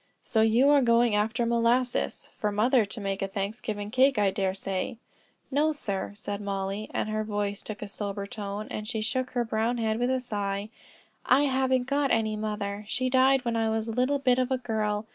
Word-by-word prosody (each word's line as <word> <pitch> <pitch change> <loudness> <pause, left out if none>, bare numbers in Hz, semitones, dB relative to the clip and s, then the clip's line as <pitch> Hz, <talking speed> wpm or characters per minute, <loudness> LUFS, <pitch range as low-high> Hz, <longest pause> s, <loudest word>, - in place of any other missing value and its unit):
So 220 - +1
you 225 +5 +4
are 290 -1 +6
going 235 -2 +4
after 220 +3 +1
molasses, 235 +2 +1
for 210 - -2
mother 225 +3 +3
to 210 +3 -8
make 195 -1 -3
a 195 - 0
Thanksgiving 205 +1 -4
cake, 260 +1 +4
I 200 -2 +3
dare 190 -1 -1
say." 195 +3 -3 0.5
"No, 300 +3 +3
sir," 200 -8 -3
said 205 0 -5
Mollie, 195 +1 -3
and - - -1
her 215 0 -1
voice 205 -1 -2
took 215 -1 -7
a - - -5
sober 200 0 -4
tone, 205 0 -5
and 215 0 -4
she 220 -1 -2
shook 255 +4 -1
her 240 - +2
brown 225 +2 0
head 220 -1 0
with 245 +1 +1
a 260 0 +1
sigh. 205 -3 -3 0.5
"I 255 +3 +4
haven't 260 -2 +2
got 280 +2 +1
any 220 -2 +1
mother; 210 -1 -3
she 255 +3 -1
died 260 0 +4
when 235 -1 0
I 225 -1 +1
was 220 0 -1
a - - -2
little 255 +5 +1
bit 255 -2 +2
of 255 0 +1
a 260 - +1
girl. 215 -3 -1
220 Hz, 205 wpm, -28 LUFS, 205-250 Hz, 0.5 s, are